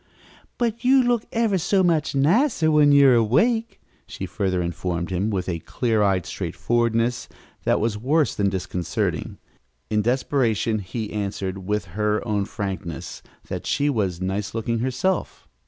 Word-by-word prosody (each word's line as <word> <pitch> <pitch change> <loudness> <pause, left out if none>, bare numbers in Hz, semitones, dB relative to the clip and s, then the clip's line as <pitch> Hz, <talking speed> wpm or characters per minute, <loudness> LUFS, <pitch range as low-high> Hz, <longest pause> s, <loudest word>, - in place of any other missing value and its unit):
"But 235 -1 -1
you 260 +1 +5
look 240 -2 +1
ever 225 -5 +1
so 190 +3 +2
much 160 -5 +1
nicer 165 - +3
when 150 -1 +5
you 140 -1 +7
are - - +6
awake," 220 - +2 0.3
she - - -6
further 95 -2 -1
informed 85 +1 -3
him, 95 +4 0
with 95 -4 -2
a 85 -3 -2
clear 110 +5 -1
eyed 95 -4 +2
straightforwardness 120 0 -1 0.4
that - - +3
was 105 -1 -1
worse 145 +6 +2
than 100 -1 +1
disconcerting. 90 -2 -3 0.5
In 105 0 +2
desperation 120 -2 +1
he 105 +3 -5
answered, 95 -2 -4
with 105 -3 -1
her 105 +2 0
own 105 -2 0
frankness, 95 -7 -5 0.3
that - - -5
she 145 0 +1
was 95 -8 -1
nice 95 +3 -3
looking 115 +1 -1
herself. 130 +10 -2
115 Hz, 150 wpm, -23 LUFS, 95-150 Hz, 0.5 s, you